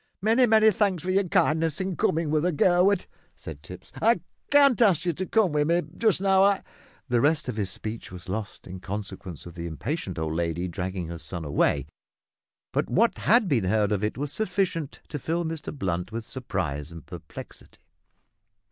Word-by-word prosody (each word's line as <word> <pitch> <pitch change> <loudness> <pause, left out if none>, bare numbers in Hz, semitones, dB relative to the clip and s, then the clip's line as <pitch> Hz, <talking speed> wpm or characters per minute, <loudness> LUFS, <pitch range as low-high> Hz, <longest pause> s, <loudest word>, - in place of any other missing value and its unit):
Many, 230 +5 +4
many 220 -1 +6
thanks 200 -6 0
for 185 - -1
your 195 +1 +2
kindness 160 -1 +2
in 190 -1 -2
coming 160 +1 +1
with 155 0 +2
her, 180 - +2
Gurwood," 180 +4 +3 0.3
said 75 -2 -9
Tipps. 90 +3 -11
"I 225 -5 +4 0.3
can't 280 -4 +5
ask 185 -7 +4
you 175 - +1
to 185 +4 -4
come 220 -6 +3
with 150 0 +1
me 170 +1 +2
just 220 -6 +2
now, 190 0 +4
I 200 0 +3 0.2
" - - -30
The 120 -1 +3
rest 155 +1 +2
of 125 - -3
his 100 -3 -1
speech 110 +3 -6
was 90 -1 -9
lost 100 +2 -5
in 95 +1 -8
consequence 95 -3 -6
of 85 - -9
the 85 0 -5
impatient 95 - -4
old 80 -1 -2
lady 85 +2 -1
dragging 90 -1 -4
her 85 -1 -6
son 80 +2 -6
away, 70 -1 +1 0.9
but - - 0
what 230 +4 +2
had 225 -2 +4
been 125 - +1
heard 105 +2 +2
of 105 -1 0
it 105 - -1
was 145 +1 -2
sufficient 185 -7 -1
to 150 - -4
fill 165 +5 -1
Mr 160 -2 -4
Blunt 90 - -3
with 115 +1 -4
surprise 85 - -4
and 85 -2 -10
perplexity. - - -11
145 Hz, 190 wpm, -26 LUFS, -, 0.9 s, many